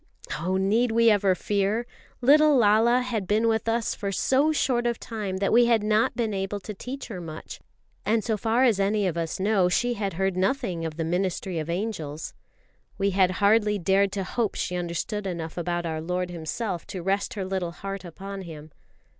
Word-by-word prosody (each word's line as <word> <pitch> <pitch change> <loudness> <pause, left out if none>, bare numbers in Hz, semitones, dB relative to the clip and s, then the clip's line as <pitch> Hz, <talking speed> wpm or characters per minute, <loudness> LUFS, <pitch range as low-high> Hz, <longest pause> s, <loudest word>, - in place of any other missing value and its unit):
Oh, 185 +4 0
need 220 +5 +2
we 230 0 +5
ever 195 -2 +3
fear? 205 +5 0 0.4
Little 295 +3 +6
Lala 230 +2 +4
had 230 -6 -3
been 215 +3 +2
with 225 0 +1
us 230 0 0
for 200 -1 -4
so 270 +9 +2
short 245 -5 +1
a 235 - 0
time 210 -5 -5
that 195 +2 0
we 240 +1 +6
had 230 -3 +3
not 215 +1 +2
been 225 -4 -1
able 195 +1 -2
to 210 - -6
teach 255 +7 -7
her 185 -5 -6
much; 160 -2 -8 0.4
and 220 0 +1
so 225 - 0
far 225 +4 +1
as 230 -6 +3
any 200 +1 +1
of 180 -3 0
us 165 +1 -3
know, 195 -2 +3
she 245 +6 +1
had 200 -3 -3
heard 190 +2 0
nothing 185 -4 -1
of 160 -1 -5
the 165 - -1
ministry 180 0 -1
of 155 +1 -5
angels. 170 -5 -4 0.6
We 200 0 +1
had 185 -1 +3
hardly 210 0 +4
dared 195 +2 +2
to 195 - -2
hope 220 +3 -1
she 180 - -2
understood 180 +4 -3
enough 165 -3 -5
about 175 0 -2
our 160 -1 -3
Lord 180 +2 -2
Himself 175 +2 -4
to 185 -3 -6
rest 195 +2 -1
her 195 -2 -3
little 190 -2 -2
heart 195 +2 -6
upon 195 +3 -7
Him. 155 -3 -10
195 Hz, 195 wpm, -26 LUFS, 180-225 Hz, 0.6 s, Little